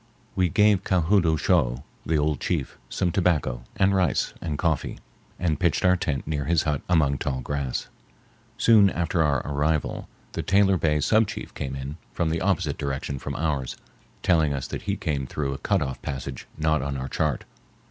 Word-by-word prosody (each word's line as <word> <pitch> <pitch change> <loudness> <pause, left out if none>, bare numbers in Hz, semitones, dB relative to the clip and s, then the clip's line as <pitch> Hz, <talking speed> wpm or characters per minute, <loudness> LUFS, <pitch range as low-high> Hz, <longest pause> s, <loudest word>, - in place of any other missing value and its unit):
We 90 -2 +2
gave 105 +2 +4
Ka 95 -2 +2
hood 90 +2 +3
oo 80 -1 +3
shough, 70 -7 +1 0.2
the 80 - +2
old 75 -2 +1
chief, 80 -7 -2
some 90 - 0
tobacco 80 - +1
and 95 0 +3
rice 90 -7 +1
and 75 -4 -3
coffee, 80 -3 -1 0.4
and 80 -4 0
pitched 85 -1 +1
our 90 0 +6
tent 75 -6 -2
near 75 -2 -2
his 80 0 +2
hut 75 -3 0
among 75 -6 +3
tall 65 -1 -2
grass. 70 -1 -3 0.7
Soon 105 -4 +6
after 85 -1 0
our 70 -4 +1
arrival 75 +2 -1 0.2
the 80 - -3
Taylor 95 +3 +3
Bay 75 -3 +1
sub 110 +8 +3
chief - - -7
came 65 -1 -4
in 70 +3 -6 0.2
from 85 -2 0
the 80 - -1
opposite 80 -7 0
direction 70 -1 -3
from - - -5
ours, 75 -5 -2 0.5
telling 80 -5 +3
us 65 - -3
that - - -5
he 100 - +1
came 70 -6 -2
through 70 -1 -2
a 70 - -6
cut 100 -2 +1
off 65 -1 -5
passage 65 -1 -5
not 80 -1 +2
on 70 0 -3
our 65 0 -4
chart. 75 -1 -1
75 Hz, 190 wpm, -25 LUFS, 70-90 Hz, 0.7 s, our